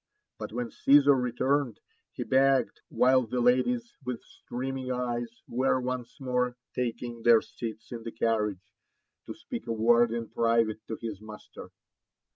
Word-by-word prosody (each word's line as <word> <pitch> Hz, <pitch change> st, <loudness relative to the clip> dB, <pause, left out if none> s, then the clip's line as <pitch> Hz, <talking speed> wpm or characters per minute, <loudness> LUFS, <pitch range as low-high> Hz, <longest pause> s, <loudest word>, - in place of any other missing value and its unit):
But -, -, -6 dB
when 120 Hz, +1 st, -4 dB
Caesar 140 Hz, 0 st, +5 dB
returned, 130 Hz, +1 st, 0 dB, 0.3 s
he -, -, -5 dB
begged, 135 Hz, 0 st, +2 dB
while 130 Hz, +1 st, +4 dB
the 125 Hz, +3 st, -2 dB
ladies 235 Hz, -, +2 dB
with 125 Hz, -2 st, -3 dB
streaming 130 Hz, +1 st, -5 dB
eyes 120 Hz, -1 st, -3 dB
were 130 Hz, +1 st, +1 dB
once 125 Hz, +1 st, -4 dB
more 125 Hz, -2 st, 0 dB, 0.2 s
taking 120 Hz, -1 st, -3 dB
their 115 Hz, -1 st, +6 dB
seats 115 Hz, -1 st, -8 dB
in 120 Hz, -2 st, -5 dB
the 115 Hz, -, -6 dB
carriage, 105 Hz, -5 st, -1 dB, 0.5 s
to -, -, -6 dB
speak -, -, -7 dB
a 115 Hz, -, -1 dB
word 115 Hz, +1 st, +4 dB
in 115 Hz, -1 st, -3 dB
private 115 Hz, -1 st, +1 dB
to 110 Hz, -, -3 dB
his 110 Hz, -4 st, -6 dB
master. 110 Hz, -1 st, -11 dB
120 Hz, 145 wpm, -28 LUFS, 115-130 Hz, 0.5 s, their